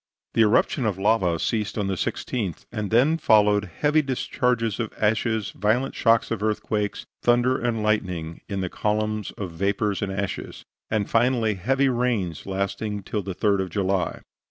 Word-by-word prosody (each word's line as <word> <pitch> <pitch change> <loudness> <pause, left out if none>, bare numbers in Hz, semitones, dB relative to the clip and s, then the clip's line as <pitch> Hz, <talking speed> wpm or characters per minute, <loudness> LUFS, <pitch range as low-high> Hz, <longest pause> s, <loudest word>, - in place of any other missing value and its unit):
The - - +3
eruption 110 +3 +3
of 100 -4 -1
lava 95 -4 +2
ceased 105 +5 -1
on 105 - 0
the 95 - -1
16th, 95 0 -3
and 105 -3 -3
then 140 +8 +3
followed 105 -5 +4 0.2
heavy 150 +1 +4
discharges 125 -4 -1
of 115 -2 -2
ashes, 110 0 0
violent 110 +7 0
shocks 115 0 +2
of 115 -3 -2
earthquakes, 105 -1 -1 0.2
thunder 120 +2 +3
and 115 -3 -1
lightning 90 -7 -1
in 100 -1 -2
the 90 - -2
columns 105 0 -1
of 95 -4 -4
vapors 100 +3 -1
and 100 -2 -2
ashes, 100 0 -4 0.2
and 110 -2 0
finally 115 -2 +2
heavy 130 +9 +1
rains, 120 - -1
lasting 100 +2 -2
till 105 +2 -2
the 95 -1 -5
3d 100 -1 +2
of 95 - -3
July. 95 -1 -1
105 Hz, 160 wpm, -24 LUFS, 100-115 Hz, 0.2 s, followed